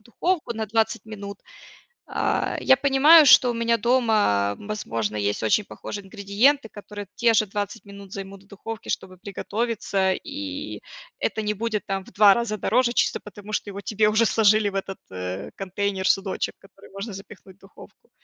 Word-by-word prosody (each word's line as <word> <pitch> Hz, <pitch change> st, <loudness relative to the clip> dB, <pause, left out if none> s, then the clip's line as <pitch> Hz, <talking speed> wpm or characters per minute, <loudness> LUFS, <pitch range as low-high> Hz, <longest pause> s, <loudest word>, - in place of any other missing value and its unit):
духовку 270 Hz, -, -2 dB
на 220 Hz, 0 st, -2 dB
20 225 Hz, +1 st, 0 dB
минут. 200 Hz, -2 st, -7 dB, 0.7 s
А, -, -, -1 dB
я 265 Hz, -, +5 dB
понимаю, 285 Hz, +4 st, +7 dB
что 250 Hz, -2 st, +7 dB
у -, -, -4 dB
меня 230 Hz, 0 st, +1 dB
дома, 215 Hz, -, +2 dB
возможно, 115 Hz, -, -3 dB
есть 100 Hz, +1 st, -1 dB
очень 150 Hz, -, +2 dB
похожие 205 Hz, -1 st, -7 dB
ингредиенты, 220 Hz, +6 st, +1 dB
которые 205 Hz, 0 st, -9 dB
те 235 Hz, -1 st, +3 dB
же 215 Hz, -, +3 dB
20 205 Hz, +3 st, -4 dB
минут 200 Hz, -1 st, -12 dB
займут 195 Hz, 0 st, -8 dB
в 195 Hz, -, -25 dB
духовке, 215 Hz, +2 st, -8 dB
чтобы 185 Hz, -1 st, -4 dB
приготовиться, 200 Hz, -1 st, -1 dB
и 285 Hz, -, -6 dB, 0.4 s
это 220 Hz, -, -1 dB
не 210 Hz, 0 st, -1 dB
будет 215 Hz, 0 st, -3 dB
там 195 Hz, -1 st, -3 dB
в -, -, -16 dB
2 205 Hz, 0 st, +7 dB
раза 235 Hz, -3 st, -2 dB
дороже, 240 Hz, +3 st, +1 dB
чисто -, -, +1 dB
потому 210 Hz, 0 st, -11 dB
что 210 Hz, -, -2 dB
его 200 Hz, 0 st, -7 dB
тебе 210 Hz, +1 st, +1 dB
уже 220 Hz, +2 st, +3 dB
сложили 215 Hz, -1 st, +3 dB
в 195 Hz, -, -10 dB
этот, 195 Hz, 0 st, -4 dB
э, 90 Hz, +1 st, -5 dB
контейнер, 195 Hz, 0 st, -2 dB
судочек, 195 Hz, 0 st, 0 dB
который 195 Hz, 0 st, -18 dB
можно 200 Hz, +3 st, -6 dB
запихнуть 195 Hz, -1 st, -12 dB
в -, -, -43 dB
духовку. 200 Hz, -, -17 dB
210 Hz, 170 wpm, -24 LUFS, 195-230 Hz, 0.7 s, понимаю